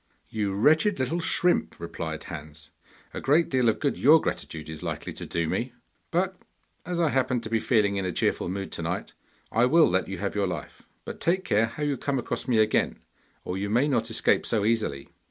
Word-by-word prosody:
'You 105 -3 -1
wretched 160 - +3
little 135 +6 -1
shrimp,' 175 +1 +1
replied 80 -2 -5
Hans, 75 -1 -9 0.4
'a - - -5
great 155 +4 +3
deal 130 -3 +3
of 110 - 0
good 140 - -1
your 155 +4 +7
gratitude 80 - -4
is 80 -1 -8
likely - - -4
to - - -7
do 85 -1 -1
me! 120 +8 -2 0.4
But 185 +2 0 0.5
as 175 -1 -2
I 165 -2 +3
happen 130 -2 +1
to 110 - -7
be 115 - +2
feeling 105 -4 +2
in 95 - -1
a - - -1
cheerful 85 - 0
mood 95 +1 -4
to - - -5
night - - -3 0.4
I 115 +2 +4
will 165 +4 +6
let 95 +1 0
you 95 0 -5
have 100 +3 -3
your 100 -2 0
life. 90 - -6 0.2
But - - -7
take 185 +3 +1
care 110 +2 +2
how 150 +6 -6
you 145 -2 0
come 140 +2 -1
across 125 - -3
me 120 -3 +2
again, 110 0 +2 0.5
or 90 +1 -3
you 100 +1 -2
may 120 +7 +3
not 120 -5 0
escape 115 - +2
so 105 -3 +1
easily! 110 -12 0
115 Hz, 210 wpm, -26 LUFS, 95-145 Hz, 0.5 s, your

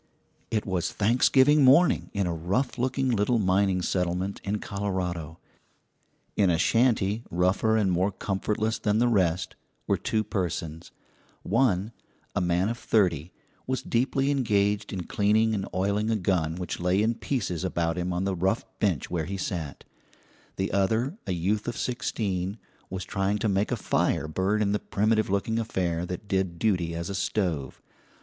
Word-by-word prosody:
It 110 -2 -1
was 90 -2 -1
Thanksgiving 130 +6 +4
morning 140 +7 +5
in 100 -2 -1
a 85 - -1
rough 95 - -1
looking 130 +1 0
little 115 +2 +2
mining 95 -2 +2
settlement 90 +2 -1
in 100 +1 -1
Colorado. 90 -6 -3 1.0
In 100 -3 +3
a 85 - +3
shanty 110 0 +2
rougher 95 +6 +2
and 100 -4 +2
more 90 +3 +1
comfortless 105 +3 -2
than 105 0 +1
the 120 +2 +3
rest 90 -6 +1 0.3
were - - +1
two 110 -1 0
persons: 85 -5 -3 0.5
one, 110 -3 +1 0.4
a - - +1
man 90 +2 +1
of 115 +1 -3
thirty, 90 -6 +1 0.4
was 130 0 -1
deeply 135 +3 +1
engaged 105 -6 +1
in 95 -3 -3
cleaning 110 +4 +2
and 95 -2 -2
oiling 100 +3 0
a 115 - +2
gun 90 -5 0
which 90 -1 -4
lay 90 +4 +2
in 115 +2 +2
pieces 110 - -3
about 85 -3 -1
him 90 0 -2
on 90 +1 -1
the 95 -1 -1
rough 95 +5 0
bench 90 -10 0
where 85 -3 -1
he 95 +3 -4
sat; 85 -6 -4 0.7
the 95 - -2
other, 110 - +1
a - - -1
youth 95 +6 -1
of 120 - -3
sixteen, 100 -5 -2 0.3
was 95 -1 -5
trying 95 +2 0
to 110 - -1
make 100 +1 +1
a - - +2
fire - - 0
burn 95 +7 0
in 100 - +1
the 105 - +1
primitive 110 +1 +1
looking 100 +4 0
affair 90 -6 -1
that 90 +3 -6
did 95 -3 -1
duty 90 -5 0
as 85 +1 -4
a 100 - -4
stove. 90 - -2
100 Hz, 165 wpm, -27 LUFS, 90-110 Hz, 1.0 s, morning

